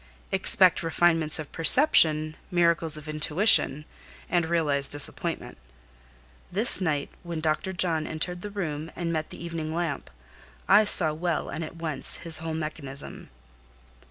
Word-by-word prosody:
Expect 190 -1 +3
refinements 165 -1 +2
of 155 -3 -8
perception, 160 - +4
miracles 170 -3 +1
of 150 0 -11
intuition, 155 0 +1 0.5
and 175 -2 0
realize 150 -5 0
disappointment. 145 - -1 0.9
This 210 +3 +4
night, 150 -5 -2
when 170 -2 -6
Dr. 155 +4 -2
John 170 -4 -1
entered 175 +3 -4
the 205 - -7
room, 165 -6 -5
and 170 -1 -4
met 155 -1 -4
the 170 - -10
evening 160 -2 -5
lamp, 170 -4 -4 0.6
I 210 +2 +5
saw 160 -6 +6
well 165 0 -3
and 165 - -5
at 160 - -9
one - - -15 0.2
glance - - +2
his 165 -2 -2
whole 160 0 -5
mechanism. 150 -3 -8
165 Hz, 140 wpm, -25 LUFS, 155-175 Hz, 0.9 s, saw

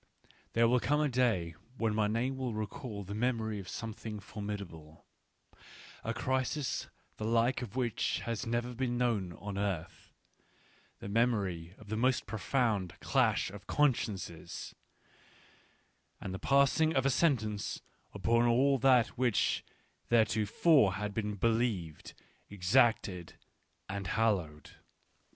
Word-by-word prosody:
There 115 0 +4
will 125 +2 +4
come 150 +5 +1
a 150 - +2
day 115 -10 +1 0.2
when 115 -2 0
my 105 -1 +2
name 120 +5 0
will 130 -4 -3
recall 110 0 -5
the 100 +2 -7
memory 110 -2 -1
of 95 - -8
some 115 -1 -5
thing 105 0 -7
formidable 100 -7 -7 0.4
— - - -19
a - - -2
crisis 130 +2 -1 0.3
the - - -5
like 115 +3 +2
of 120 -2 -7
which 120 -4 0
has 115 -1 -3
never 120 +1 -1
been 120 0 -1
known 110 -8 0
on 100 +2 -6
earth, 95 -5 -4 0.9
the - - -6
memory 100 -6 0
of 110 -2 -15
the 110 - -2
most 130 +2 +2
profound 110 -4 -1
clash - - +1
of 100 0 -11
consciences, 105 - -1 1.5
and 95 - -5
the 95 - -5
passing 140 +3 +3
of 135 -1 +2
a 135 - +4
sentence 110 -10 0 0.3
upon 115 +1 +2
all 135 +3 +3
that 125 -4 +5
which 125 -5 +2 0.5
theretofore 110 - +4
had 105 +2 -3
been 105 -1 -2
believed, 110 -7 -1 0.3
exacted, 100 -3 +2 0.5
and 100 -1 -4
hallowed. 90 -9 0
110 Hz, 130 wpm, -32 LUFS, 100-125 Hz, 1.5 s, that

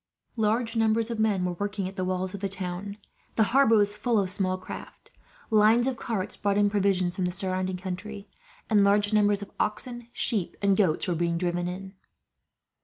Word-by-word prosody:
Large 225 +1 0
numbers 225 +1 +2
of 230 - -4
men 205 -4 +2
were 180 - 0
working 200 +1 -3
at 190 - -8
the 185 - -2
walls 185 +1 -2
of 200 - -5
the 195 0 -2
town. 190 +1 -4 0.4
The 220 - +4
harbour 270 -4 +5
was 205 -1 +2
full 230 +2 0
of 190 -3 +1
small 185 -1 0
craft. 185 - -10 0.4
Lines 220 +2 +5
of 265 -1 0
carts 210 -4 -2
brought 200 -1 0
in 205 0 +3
provisions 190 -3 +1
from 185 - 0
the 180 - -1
surrounding 185 0 -1
country, 195 +3 -6 0.4
and 210 -3 +4
large 205 +1 +3
numbers 205 -1 +3
of 200 - -12
oxen, 235 +3 -2
sheep, 215 -7 -2
and 200 -1 +3
goats 185 -3 +1
were 180 - +1
being 170 0 0
driven 175 0 -1
in. 190 +2 -6
200 Hz, 190 wpm, -27 LUFS, 185-215 Hz, 0.4 s, harbour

